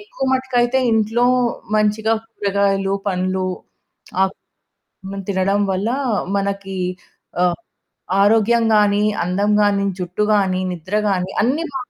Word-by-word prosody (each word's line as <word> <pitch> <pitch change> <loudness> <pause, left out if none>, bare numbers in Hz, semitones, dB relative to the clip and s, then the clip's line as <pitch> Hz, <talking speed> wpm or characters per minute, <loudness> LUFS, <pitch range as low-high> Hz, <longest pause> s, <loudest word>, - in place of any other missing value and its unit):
ఎక్కువ 410 -10 -6
మట్టుకైతే 260 -1 +1
ఇంట్లో 225 +2 +2 0.5
మంచిగా 215 +1 +2
కూరగాయలు, 200 -2 0
పండ్లు. 185 0 -1 0.8
అక్ 190 - -4 0.9
తినడం 195 +1 +1
వల్ల 190 +4 -1 0.5
మనకి 195 -1 -3 0.6
ఆహ్, 175 -1 +2 0.6
ఆరోగ్యం 225 +3 +4
గానీ, 205 0 +3 0.2
అందం 200 +4 0
గానీ, 200 -1 +2
జుట్టు 180 +3 -2
గానీ, 190 -2 +1
నిద్ర 180 +3 -5
గానీ, 185 -1 -1
అన్నీ 265 +9 +1
బావుం 260 -2 -5
200 Hz, 105 wpm, -19 LUFS, 190-225 Hz, 0.9 s, ఆరోగ్యం